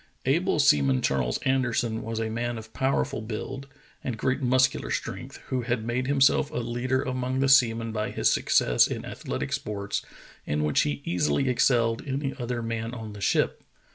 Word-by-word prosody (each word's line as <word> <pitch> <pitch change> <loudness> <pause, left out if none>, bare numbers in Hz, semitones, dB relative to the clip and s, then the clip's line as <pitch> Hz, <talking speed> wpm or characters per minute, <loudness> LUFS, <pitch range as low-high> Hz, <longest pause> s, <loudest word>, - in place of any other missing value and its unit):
Able - - +2
Seaman 70 -3 +4
Charles 65 -3 +1
Anderson 120 -4 0
was 115 0 -4
a 110 - -1
man 120 +1 -2
of 110 0 -10
power 135 +1 +1
ful - - -5
build 125 +5 -6 0.4
and 120 -3 -3
great 130 +5 0
muscular 130 - +2
strength, - - -4
who 130 -1 0
had 120 -2 -2
made 125 +2 -1
himself 140 +1 +3
a - - -10
leader 120 +3 -1
among 130 0 -2
the 135 - +2
seamen 115 -4 +4
by 110 -1 -2
his - - 0
success - - +3
in - - -5
athletic - - -4
sports, 100 -1 -3 0.4
in 75 +1 -1
which 75 -1 +2
he 70 -1 -2
easily 85 - +1
excelled 115 -2 +2
any 135 0 -2
other 120 -1 -3
man 115 +1 -3
on 110 -3 -7
the 105 - -10
ship. - - +1
115 Hz, 175 wpm, -26 LUFS, 110-130 Hz, 0.4 s, Seaman